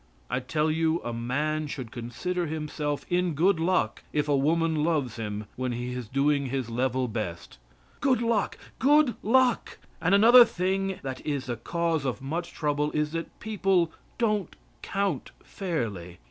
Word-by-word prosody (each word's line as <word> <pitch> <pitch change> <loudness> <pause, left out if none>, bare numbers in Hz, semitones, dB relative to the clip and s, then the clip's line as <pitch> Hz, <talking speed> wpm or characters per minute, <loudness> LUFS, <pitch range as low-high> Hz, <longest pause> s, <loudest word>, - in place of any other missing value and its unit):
I 125 - +1
tell 150 +4 0
you 160 +1 +1
a 120 - -3
man 150 +6 -1
should 130 -5 -6
consider 165 +9 -3
himself 150 -1 -3
in 180 -2 +1
good 175 +3 +3
luck 165 -10 +1
if 150 0 0
a 145 - +3
woman 160 +2 +2
loves 145 -8 0
him 105 -1 -4
when 130 -1 -1
he 120 +1 -4
is 125 -3 -5
doing 140 +2 +1
his 130 -2 -3
level 130 +1 0
best! 85 - -5 0.4
Good 265 -3 +3
luck! 230 -3 0 0.2
Good 290 -1 +5
luck! 250 +1 +2 0.2
And 180 +4 +4
another 235 +4 +9
thing 190 -2 -1
that 130 -1 -5
is 140 -3 -2
the 120 - -2
cause 165 +4 -1
of 130 -2 -2
much 160 +6 -4
trouble 150 -1 0
is 150 0 0
that 165 0 -5
people 195 -5 +1 0.3
don't 210 -6 0 0.3
count 200 0 -1
fairly. 110 - -4
150 Hz, 160 wpm, -27 LUFS, 130-180 Hz, 0.4 s, another